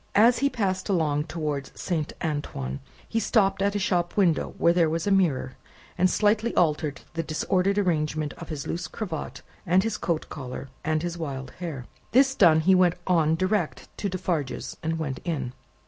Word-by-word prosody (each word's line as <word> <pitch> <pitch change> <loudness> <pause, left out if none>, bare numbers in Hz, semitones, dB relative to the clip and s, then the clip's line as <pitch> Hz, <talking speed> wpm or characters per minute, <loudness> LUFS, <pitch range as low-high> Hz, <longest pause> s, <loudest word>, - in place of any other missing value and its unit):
As 235 +4 +6
he 280 - +3
passed 190 -6 -1
along 150 -5 +1
towards 150 -4 -4
Saint 160 -4 -2
Antoine, 105 - -3 0.3
he 225 - 0
stopped 195 -3 +2
at 200 +1 +1
a - - +3
shop 175 -2 0
window 175 -6 +2
where 170 - +4
there 170 -2 +3
was 165 +1 -1
a 205 - +1
mirror, 160 -9 +2 0.4
and 185 0 +3
slightly 215 +4 +2
altered 150 -4 +1
the 165 - -1
disordered 180 +5 0
arrangement 155 -5 0
of - - -8
his 150 -4 -4
loose 170 -1 -3
cravat, 160 - -5 0.2
and 185 +2 +3
his 225 - -2
coat 165 -3 -1
collar, 130 -1 -7
and 155 +1 0
his 175 0 -3
wild 135 -4 -5
hair. 155 -8 -5 0.3
This 270 +2 +5
done, 165 -10 +5
he 190 +4 +5
went 180 -2 +4
on 160 -3 +3
direct 185 -1 -1
to 200 - -1
Defarge's, 175 -7 -2
and 165 0 -1
went 140 -5 -3
in. 140 -8 -3
170 Hz, 180 wpm, -26 LUFS, 150-190 Hz, 0.4 s, As